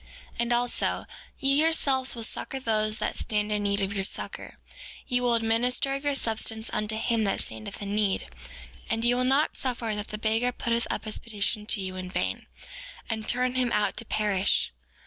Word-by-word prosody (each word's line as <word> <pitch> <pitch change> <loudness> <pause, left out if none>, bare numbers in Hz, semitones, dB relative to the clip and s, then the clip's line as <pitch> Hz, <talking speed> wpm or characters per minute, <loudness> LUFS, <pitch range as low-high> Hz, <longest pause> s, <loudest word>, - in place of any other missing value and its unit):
4:16 - - -23
And 235 0 +2
also, 245 0 +1 0.3
ye 275 +2 +3
yourselves 275 -6 +2
will 230 - -4
succor 265 +4 0
those 215 -3 +1
that - - -2
stand 210 -1 -1
in 210 0 +1
need 200 0 +1
of 195 +1 -1
your 195 -1 0
succor; - - -4 0.5
ye 245 -1 +1
will 245 -1 +3
administer 235 +4 +2
of 275 +1 -3
your 285 -1 +1
substance 220 -2 -1
unto 215 +1 -1
him 230 0 +1
that 195 - 0
standeth 110 - -2
in 200 0 -3
need; 210 -2 +1 0.6
and 225 -1 0
ye 240 - +4
will 250 +1 +2
not 270 +4 +2
suffer 240 -4 -2
that 210 0 -4
the 210 - -4
beggar 225 +3 +1
putteth 235 -1 -1
up - - -3
his 215 - -4
petition 210 -1 0
to 210 - +2
you 185 -1 -4
in 185 0 -5
vain, - - -2 0.6
and 220 -1 -2
turn 250 0 +1
him 255 -2 +1
out 210 0 +1
to - - -4
perish. 205 -3 +1
225 Hz, 195 wpm, -27 LUFS, 210-245 Hz, 0.6 s, ye